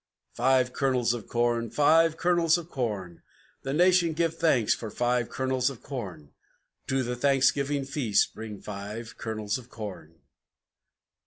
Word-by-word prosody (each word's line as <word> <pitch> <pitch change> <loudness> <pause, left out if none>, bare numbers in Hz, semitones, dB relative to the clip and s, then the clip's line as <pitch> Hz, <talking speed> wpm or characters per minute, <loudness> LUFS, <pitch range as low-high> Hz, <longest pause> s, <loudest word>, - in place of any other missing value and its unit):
Five 130 0 +2
Kernels 125 -3 +1
of 120 -4 -6
Corn! 120 -1 0
Five 155 +6 +4
Kernels 170 -1 +3
of 175 0 -9
Corn! 105 - -4 0.4
The 135 - -4
nation 175 +1 +4
gives 165 0 0
thanks 145 -10 +3
for 110 - -6
Five 120 +2 0
Kernels 130 0 0
of 135 -4 -10
Corn! 95 - -7 0.6
To 130 0 +1
the 125 0 -3
Thanksgiving 140 +1 +2
Feast 135 -7 +1
bring 110 -2 -8
Five 105 +3 -7
Kernels 110 -1 -3
of 125 -1 -15
Corn! 95 -8 -8
125 Hz, 140 wpm, -27 LUFS, 110-145 Hz, 0.6 s, Five